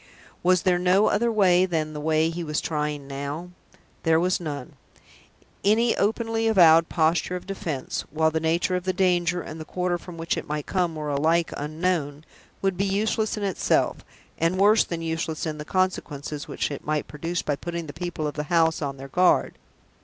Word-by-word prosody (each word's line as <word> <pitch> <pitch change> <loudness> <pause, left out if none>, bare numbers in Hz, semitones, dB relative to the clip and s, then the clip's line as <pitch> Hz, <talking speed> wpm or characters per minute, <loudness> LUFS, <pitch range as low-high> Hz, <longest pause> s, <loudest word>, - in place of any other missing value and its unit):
Was 180 -1 +3
there 180 -1 +3
no 185 +3 +4
other 235 +3 +2
way 185 -4 +4
than 155 -3 -2
the 150 - -5
way 160 +1 +2
he 170 +1 -4
was 150 -2 -1
trying 150 -2 -2
now? 140 +5 -5 0.5
There 165 -1 +3
was 180 +2 +1
none. 145 -6 -6 0.9
Any 225 +4 +3
openly 225 +2 0
avowed 165 -6 +6
posture 165 +2 +1
of 180 - -6
defense 160 -8 -4
while 160 +1 +1
the 160 - 0
nature 165 +3 +1
of 180 0 -3
the 185 - 0
danger, 175 -1 +1
and 160 +1 -8
the - - -4
quarter 180 +1 -2
from 175 -1 -10
which 165 0 -1
it - - -5
might 150 -1 -3
come, 175 -4 0
were 150 -1 -4
alike 160 +4 +1
unknown 155 -1 -2 0.4
would 195 -2 +1
be 195 - +1
useless 215 +2 0
in 210 - -3
itself, 195 -2 +1 0.4
and 165 +3 +1
worse 210 +3 +5
than 165 -1 -5
useless 160 -1 -2
in 155 -1 -4
the 150 - -6
consequences 155 -5 -2
which - - -2
it 140 - -6
might 155 0 -1
produce 165 +3 -3
by 145 - 0
putting 170 +3 -5
the 145 - -8
people 175 -2 -4
of 150 - -2
the 150 +1 -4
house 165 -2 +3
on 140 -2 -3
their 135 +1 -8
guard. 180 +6 +3
165 Hz, 190 wpm, -25 LUFS, 155-185 Hz, 0.9 s, avowed